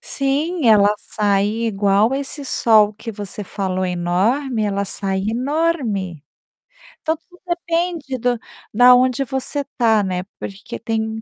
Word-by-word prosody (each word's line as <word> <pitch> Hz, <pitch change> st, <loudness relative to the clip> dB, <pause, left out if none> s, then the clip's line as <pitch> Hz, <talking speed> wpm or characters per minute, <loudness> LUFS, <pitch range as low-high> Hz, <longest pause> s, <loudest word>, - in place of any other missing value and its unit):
Sim, 300 Hz, -, -1 dB
ela 205 Hz, -1 st, +5 dB
sai 200 Hz, -2 st, 0 dB, 0.2 s
igual 205 Hz, +3 st, +2 dB
esse 280 Hz, +1 st, -4 dB
sol 215 Hz, -5 st, +4 dB
que 225 Hz, +2 st, -7 dB
você 205 Hz, -1 st, -7 dB
falou 185 Hz, -1 st, -2 dB
enorme, 195 Hz, +9 st, 0 dB
ela 200 Hz, -1 st, -1 dB
sai 195 Hz, -1 st, -2 dB
enorme. 240 Hz, -, -1 dB, 0.8 s
Então, 320 Hz, 0 st, 0 dB
tudo 355 Hz, +3 st, -22 dB
depende 340 Hz, -5 st, -2 dB
do 245 Hz, -1 st, 0 dB, 0.3 s
da 245 Hz, +3 st, +8 dB
onde 255 Hz, +1 st, +2 dB
você 265 Hz, +2 st, -3 dB
tá, 225 Hz, -4 st, +3 dB
né, 185 Hz, -1 st, -2 dB, 0.2 s
porque 195 Hz, 0 st, -7 dB
tem 220 Hz, 0 st, -2 dB
225 Hz, 130 wpm, -20 LUFS, 200-275 Hz, 0.8 s, da